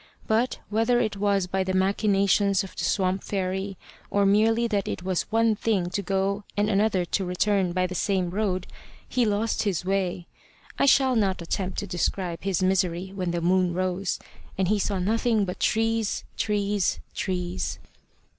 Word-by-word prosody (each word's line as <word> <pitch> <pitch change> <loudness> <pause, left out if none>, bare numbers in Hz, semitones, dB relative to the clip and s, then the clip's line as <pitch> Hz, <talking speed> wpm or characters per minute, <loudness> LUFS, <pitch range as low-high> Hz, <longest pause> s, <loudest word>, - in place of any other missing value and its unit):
But, 225 +3 +1
whether 225 +3 +2
it 220 -4 0
was 200 -1 +1
by 190 +1 -1
the 185 0 -2
machinations 200 0 +2
of 195 - -10
the - - -4
swamp 190 -1 +1
fairy, 190 0 -2 0.3
or 200 0 +2
merely 225 +4 +3
that 205 -4 -1
it - - -4
is 185 +1 -1
one 225 0 +3
thing 195 -5 0
to 200 - -1
go 195 +2 -1
and 210 +1 +2
another 195 -3 +2
to 195 - -1
return 185 +1 +1
by 185 +1 +1
the 180 - -4
same 185 -1 0
road, 190 -2 -1 0.4
he 250 -2 +1
lost 210 +2 0
his 190 -5 -1
way. 185 -2 -1 0.5
I - - +4
shall 265 -2 +5
not 195 -4 +1
attempt 185 +2 -3
to - - -4
describe 175 -1 -2
his 190 -2 0
misery 185 -1 +1
when 185 -3 -2
the 170 0 -1
moon 180 0 +2
rose, 185 0 -1 0.4
and 190 -1 +1
he 210 0 +2
saw 200 0 0
nothing 220 +3 +1
but 180 - -5
trees, 225 -1 +1
trees, 205 -2 0
trees. 180 -2 -2
195 Hz, 170 wpm, -26 LUFS, 185-210 Hz, 0.5 s, shall